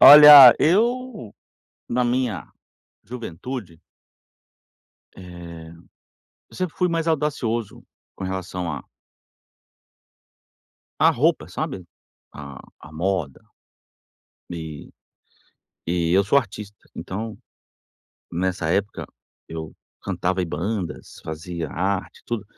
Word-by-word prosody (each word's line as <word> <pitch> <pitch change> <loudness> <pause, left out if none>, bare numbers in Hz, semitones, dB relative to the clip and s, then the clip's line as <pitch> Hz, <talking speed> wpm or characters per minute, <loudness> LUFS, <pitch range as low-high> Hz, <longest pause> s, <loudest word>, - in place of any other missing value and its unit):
Olha, 145 -3 +12
eu, 225 - +1 0.5
na 125 +1 0
minha 120 -4 -1 0.5
juventude 115 -4 -7 1.4
eh, 85 -3 -10 0.8
eu - - -15
sempre 185 -4 -3
fui 180 - +1
mais 165 -1 -1
audacioso, 135 -8 -1 0.3
com - - -7
relação 95 -2 -4
à 75 - -6 2.2
à - - +6
roupa, - - +1
sabe, 95 - -5 0.5
à 70 -3 -9 0.2
à 75 - -13
moda. 85 -4 -2 1.1
E 80 -3 -7 1.0
e 85 -1 0
eu 95 +2 +5
sou 140 +8 +4
artista, 105 -4 -7 0.2
então, 110 +3 -6 0.9
nessa 90 -1 -2
época, 100 +3 -1 0.4
eu 80 -1 -7 0.3
cantava 95 +1 -1
em - - -3
bandas, 90 +4 -4
fazia 80 0 -5
arte, 95 +2 -3
tudo. 115 -4 -3
95 Hz, 95 wpm, -23 LUFS, 85-125 Hz, 2.2 s, Olha